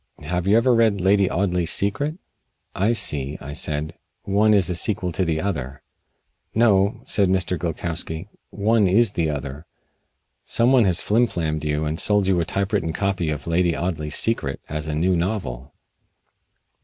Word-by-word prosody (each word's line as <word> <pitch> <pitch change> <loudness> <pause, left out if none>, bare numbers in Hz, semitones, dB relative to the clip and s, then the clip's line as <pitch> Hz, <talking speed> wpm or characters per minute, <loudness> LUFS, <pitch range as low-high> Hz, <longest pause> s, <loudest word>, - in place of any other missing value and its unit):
Have 90 +1 -2
you 105 +3 +5
ever 120 +2 +3
read 115 -3 +3
'Lady 95 +1 +3
Audley's 90 -2 0
Secret'?" 125 - 0 0.6
"I 100 +5 +1
see," 75 - -2
I 70 +1 -8
said. 75 +1 -3 0.3
"One 105 +2 +2
is 100 -5 +4
a 90 - -1
sequel 90 +1 -1
to 95 - -1
the 80 -3 -1
other." 70 -8 -4 0.7
"No," 100 -3 +3
said 100 -3 +1
Mr. 95 -1 0
Gilkowsky. 85 0 -4 0.2
"One 105 0 +2
is 105 +3 +3
the 85 -5 -1
other. 70 +1 -5 0.8
Some 120 +2 +2
one 125 -4 +5
has 90 -3 +3
flim 120 +3 +2
flammed 80 -6 -3
you 75 +1 -1
and 75 +1 -3
sold 105 -2 +2
you 95 -2 +2
a 85 - 0
typewritten 95 -3 -1
copy 95 -3 -1
of 75 -2 -4
'Lady 85 -1 +1
Audley's 75 -2 -2
Secret' 90 -12 -1
as 75 0 -4
a 75 - -2
new 90 +4 +2
novel." 80 - -3
90 Hz, 165 wpm, -22 LUFS, 80-100 Hz, 0.8 s, you